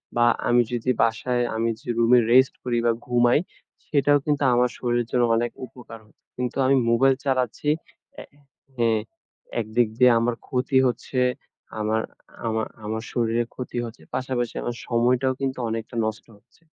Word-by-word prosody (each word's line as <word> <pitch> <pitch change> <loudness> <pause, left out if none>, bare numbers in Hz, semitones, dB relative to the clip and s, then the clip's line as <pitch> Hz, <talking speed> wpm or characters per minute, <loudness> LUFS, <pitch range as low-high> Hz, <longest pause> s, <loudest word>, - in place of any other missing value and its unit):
বা 120 0 +4 0.2
আমি 120 0 +5
যদি 120 +1 -2
বাসায় 120 +2 +1
আমি 115 +1 0
যে - - -19
রুমে 120 +1 +5
রেস্ট 130 +1 +5
করি 120 -1 -1
বা 115 - +4
ঘুমাই 120 +2 +3 0.5
সেটাও 145 -1 +3
কিন্তু 145 -1 0
আমার 125 0 +3
শরীরের 120 -1 -1
জন্য 125 -1 +2
অনেক 120 +1 0
উপকার 115 -2 -12
হচ্ছে। 105 - -30
কিন্তু 125 +1 -3
আমি 135 +1 +4
মোবাইল 130 +3 +4
চালাচ্ছি 130 +2 0 0.5
এ - - -9 0.5
হ্যাঁ। 115 -2 +2 0.6
একদিক 110 +2 +1
দিয়ে 125 -1 +6
আমার 120 0 0
ক্ষতি 130 0 0
হচ্ছে, 125 +2 -3 0.6
আমার 110 +1 0 0.5
আমার 110 0 -1 0.2
আমার 110 +1 -3
শরীরের 115 -1 0
ক্ষতি 125 -1 -6
হচ্ছে। 115 -8 -10
পাশাপাশি 130 -2 -2
আমার 120 - -3
সময়টাও 125 +2 +2
কিন্তু 135 -1 -2
অনেকটা 115 +1 -5
নষ্ট 110 0 -4
হচ্ছে। 110 +8 -31
120 Hz, 155 wpm, -24 LUFS, 115-125 Hz, 0.6 s, দিয়ে